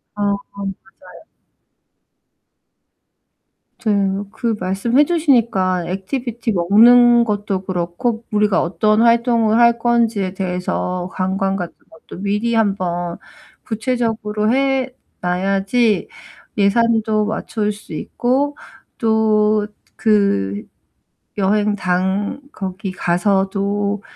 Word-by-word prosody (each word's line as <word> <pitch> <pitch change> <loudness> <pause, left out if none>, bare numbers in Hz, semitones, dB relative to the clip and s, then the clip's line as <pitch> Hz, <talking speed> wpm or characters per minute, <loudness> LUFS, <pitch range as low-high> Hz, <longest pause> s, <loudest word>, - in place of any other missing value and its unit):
아 205 - -4 0.3
맞아요. 195 -1 -6 2.9
저 220 -2 -1 0.4
그 225 -1 -2
말씀 195 +8 0
해 295 - +7
주시니까 235 - +1
액티비티 230 +5 -3
먹는 235 +6 +6
것도 205 -3 -2
그렇고 190 +6 -2
우리가 210 -2 +2
어떤 215 +6 +1
활동을 235 -1 +3
할 235 0 +5
건지에 225 -5 +1
대해서 180 -1 -3
관광 195 +1 -1
같은 175 -3 -5 0.2
것도 160 +3 -12
미리 210 +4 0
한번 180 -5 -1 0.5
구체적으로 220 -2 -1
해 270 0 +1 0.3
놔야지 195 +5 +1 1.0
예산도 215 -1 +1
맞출 215 -1 -2
수 210 +1 -13
있고 275 +4 -1 0.4
또 215 -2 +2 0.3
그 105 - +1 0.7
여행 205 +1 +1
당 190 +6 -1
거기 190 0 -5
가서도 200 +3 0
210 Hz, 190 characters per minute, -19 LUFS, 190-230 Hz, 2.9 s, 해